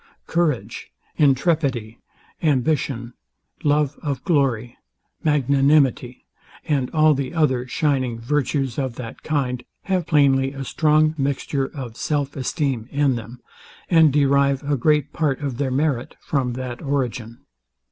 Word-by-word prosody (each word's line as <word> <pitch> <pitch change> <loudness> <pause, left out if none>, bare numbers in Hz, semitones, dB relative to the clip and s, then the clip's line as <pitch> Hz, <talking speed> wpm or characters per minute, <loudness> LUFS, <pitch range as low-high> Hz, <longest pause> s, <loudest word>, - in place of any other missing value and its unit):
Courage, 165 -7 -1 0.3
intrepidity, 135 -5 +1 0.4
ambition, 130 -4 0 0.5
love 150 -1 +1
of 140 -4 -3
glory, 130 - 0 0.5
magnanimity, 140 -3 +2 0.4
and 140 -5 0
all 155 -1 +4
the 140 +3 -3
other 130 -6 +1
shining 130 -4 0
virtues 135 +1 -1
of 130 -3 -2
that 125 -1 -8
kind, 130 -5 -2 0.2
have 185 -4 -1
plainly 135 -3 +3
a 135 -1 -5
strong 155 +2 +2
mixture 135 0 -1
of 125 -6 -8
self 145 -2 -2
esteem 130 -3 -2
in 140 -2 +2
them, 120 +2 -8 0.5
and 160 -3 +6
derive 140 -1 +2
a 145 0 0
great 150 +2 +1
part 145 -4 0
of 135 -4 -4
their 140 -2 0
merit 135 -2 -1
from 130 -4 -1
that 125 -1 -6
origin. 125 -5 -3
140 Hz, 125 wpm, -22 LUFS, 125-150 Hz, 0.5 s, and